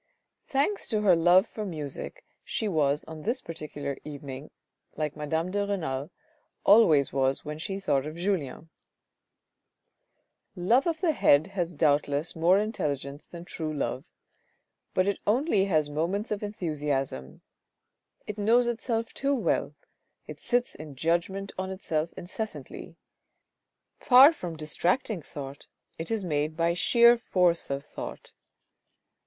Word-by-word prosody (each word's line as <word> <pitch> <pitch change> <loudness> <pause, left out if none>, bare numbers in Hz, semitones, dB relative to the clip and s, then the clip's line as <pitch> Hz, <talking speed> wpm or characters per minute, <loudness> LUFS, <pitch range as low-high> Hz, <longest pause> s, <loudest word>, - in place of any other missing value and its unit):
Thanks 290 +9 0
to 215 -3 +1
her 195 -4 +5
love 175 +4 +5
for 215 - -6
music 165 - -6 0.2
she 220 - -2
was 150 -5 +1
on 160 -1 -9
this 235 - -1
particular 150 -4 -6
evening 140 -1 -8 0.5
like 150 -2 -2
madame 160 +4 -2
de 205 +1 0
Renal 160 -8 -3 0.6
always 165 - +6
was, 135 0 0
when 150 +1 -5
she 195 +4 -4
thought 145 -6 0
of 155 - -7
Julien. 165 -4 -3 1.8
Love 230 - +3
of 325 -1 -1
the 345 - +3
head 145 - +4
has 175 -3 -2
doubtless 145 +2 +1
more 170 +4 +4
intelligence 145 - -3
than 170 0 -10
true 160 -3 -4
love, 140 -2 -2 0.9
but 185 +1 +3
it 200 - 0
only 220 - +3
has 155 -6 +2
moments 170 +9 -2
of 210 - -2
enthusiasm. 150 - -3 0.8
It 210 0 -6
knows 230 +4 +4
itself 230 -1 -2
too 280 +1 +1
well, 250 - 0 0.5
it - - -9
sits 245 0 0
in 150 -2 -10
judgment 170 +7 -1
on 190 0 -2
itself 170 -4 -2
incessantly; 215 +5 -6 1.0
far 270 +4 +8
from 175 - -6
distracting 175 - -1
thought 140 -2 -9 0.3
it 165 - -4
is 220 -4 -1
made 155 -1 -1
by 170 0 +2
sheer 235 +6 +5
force 180 -6 +1
of 140 +1 -3
thought. - - -8
170 Hz, 135 wpm, -28 LUFS, 150-210 Hz, 1.8 s, far